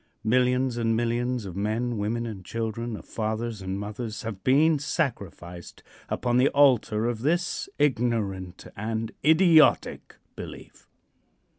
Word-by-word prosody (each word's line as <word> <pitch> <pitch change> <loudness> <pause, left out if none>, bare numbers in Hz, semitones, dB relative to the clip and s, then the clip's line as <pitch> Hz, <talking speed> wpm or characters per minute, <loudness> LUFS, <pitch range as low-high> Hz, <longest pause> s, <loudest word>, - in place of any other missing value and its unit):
Millions 125 +2 +2
and 115 -1 +1
millions 120 0 -1
of 90 -3 -7
men, 110 +4 -1
women 110 +3 -2
and 105 -5 -7
children, 115 +2 -4
of - - -12
fathers 110 0 -3
and 95 +1 -4
mothers, 105 +2 -5
have 105 -4 -6
been 150 +4 +4
sacrificed 100 - -4 0.3
upon 120 -1 0
the 130 +2 +5
altar 125 -6 +3
of 120 -2 -2
this 175 - -1
ignorant 110 -9 -1
and 110 +1 -3
idiotic 160 +1 +4 0.2
belief. - - -10
115 Hz, 125 wpm, -26 LUFS, 105-125 Hz, 0.3 s, the